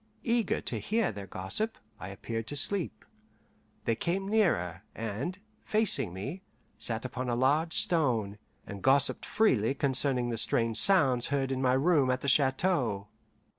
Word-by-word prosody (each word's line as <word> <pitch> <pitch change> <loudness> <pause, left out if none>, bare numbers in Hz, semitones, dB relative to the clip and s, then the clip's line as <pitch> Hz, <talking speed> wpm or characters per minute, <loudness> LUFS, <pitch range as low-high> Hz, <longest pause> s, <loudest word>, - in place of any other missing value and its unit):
Eager 235 -1 +1
to - - -3
hear 220 -1 0
their 100 -1 -8
gossip, 95 - -4 0.2
I - - -7
appeared 115 +3 -5
to 145 - -6
sleep. 180 +5 -1 0.8
They 115 - +2
came 190 +9 -2
nearer, 130 - +1
and, 115 - -4 0.3
facing 205 - 0
me, 120 - -6 0.4
sat 115 +1 -2
upon 130 0 -4
a 120 - 0
large 150 +6 +1
stone, 115 - +1 0.3
and 100 -1 -8
gossiped 135 +3 +2
freely 135 - +2
concerning 130 -2 +1
the 115 - -2
strange 115 0 +1
sounds 135 - +5
heard 135 -1 -1
in 130 0 -2
my 130 -1 +2
room 140 0 +3
at 125 0 0
the - - -4
chateau. 130 - +1
130 Hz, 150 wpm, -29 LUFS, 115-170 Hz, 0.8 s, sounds